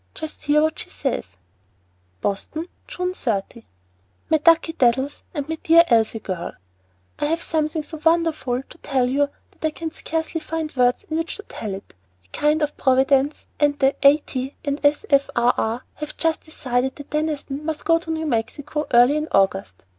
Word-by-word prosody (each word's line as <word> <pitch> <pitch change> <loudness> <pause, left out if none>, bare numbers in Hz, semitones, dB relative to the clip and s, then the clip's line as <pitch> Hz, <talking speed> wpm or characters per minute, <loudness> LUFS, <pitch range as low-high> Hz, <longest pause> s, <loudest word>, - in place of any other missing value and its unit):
Just 315 -1 -7
hear 300 +1 +4
what 315 0 0
she - - -6
says:" 270 - -2 0.9
BOSTON, 310 - -2 0.2
June 360 0 -3
30. 225 - -3 0.6
MY 315 - +6
DUCKY 325 +1 +4
DADDLES 265 0 +1
AND 290 -1 -3
MY 320 0 -4
DEAR 335 +1 +7
ELSIE 225 -2 +3
GIRL, 185 -4 -4 0.7
I - - +1
have 330 +3 0
something 310 0 0
so 305 +1 -9
wonderful 325 -6 +2
to - - -16
tell 260 -3 +1
that 280 +3 +1 0.3
I 315 - +3
can 320 +1 -5
scarcely 325 0 -3
find 315 -1 -4
words 250 -1 +3
in 315 - -3
which 330 - -3
to 420 - -8
tell 210 - -5
it. 195 - -12 0.3
A - - -30
kind 300 - +1
Providence 270 +2 +2
and 290 -1 +3
the 270 -1 +3
A. 280 +1 +7
T. 265 -2 -5
and 285 +1 -2
S. 290 +7 +3
F. 280 0 +4
R. 240 +1 +4
R. 225 +3 -1
have 300 0 -7
just 325 -1 +1
decided 260 -4 -1
that 285 - -11
Deniston 300 -2 -2
must 310 -1 -4
go 330 0 +4
to 330 - -11
New 320 0 -1
Mexico 290 +4 -2
early 245 +4 +6
in 305 +1 -2
August. 95 - +1
290 Hz, 175 wpm, -22 LUFS, 250-315 Hz, 0.9 s, DEAR